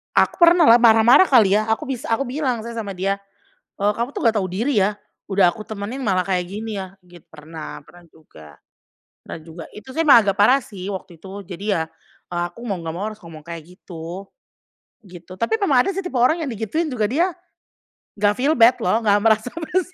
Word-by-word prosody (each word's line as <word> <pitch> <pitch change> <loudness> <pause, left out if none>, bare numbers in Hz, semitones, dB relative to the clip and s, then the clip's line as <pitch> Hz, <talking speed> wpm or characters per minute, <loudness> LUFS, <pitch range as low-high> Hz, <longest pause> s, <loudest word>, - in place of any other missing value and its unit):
Aku - - +3
pernahlah, 335 -8 +7
marah-marah 235 +4 +6
kali 225 - +4
ya, 215 - +2
aku 250 +7 -2
bis 265 -3 -4
aku 230 +4 -1
bilang 255 -2 -2
sih 235 - -7
sama 215 -3 -5
dia, 195 +1 -1 0.6
"Eee, 205 +1 +1
kamu 235 +4 -3
tuh - - -6
nggak 225 - +3
tau 195 -3 -1
diri 215 +4 0
ya, 205 +2 -1 0.3
udah 190 -3 +3
aku 215 - -8
temenin 215 +5 -6
malah 185 -6 0
kayak 180 -2 -2
gini 215 +2 -6
ya," 190 +1 -12
git 175 -2 -16
pernah 155 0 -9
pernah 175 0 -17
juga 80 - -17 0.6
pernah - - -9
juga. 165 +1 -10
Itu 215 +5 -11
sih 320 - -2
emang 240 -6 +8
agak 195 -1 0
parah 255 +6 +5
sih 190 -2 -9
waktu 185 -4 -7
itu 195 +2 -9
jadi 185 +1 -9
ya, 165 - 0 0.5
eee, 175 0 -1
aku 230 +7 -13
mau 200 -6 -3
nggak 165 -1 -6
mau 195 - -4
harus 215 - -16
ngomong 160 -3 -12
kayak 165 -1 -9
gitu. 175 +1 -9 0.8
Gitu, 175 -1 -13
tapi 230 - 0
memang 270 -10 +3
ada - - +1
sih 390 - -3
tipe 360 -9 -4
orang 315 +8 +2
yang 290 - -3
digituin 235 - -3
juga 225 -5 0
dia 325 - +1 0.9
nggak 205 0 +2
feel 275 +8 0
bad 240 +1 +5
loh, 225 0 0
nggak 205 -1 +3
merasa 220 +2 +1
bersalah. 350 +2 -3
210 Hz, 210 wpm, -21 LUFS, 185-250 Hz, 0.9 s, emang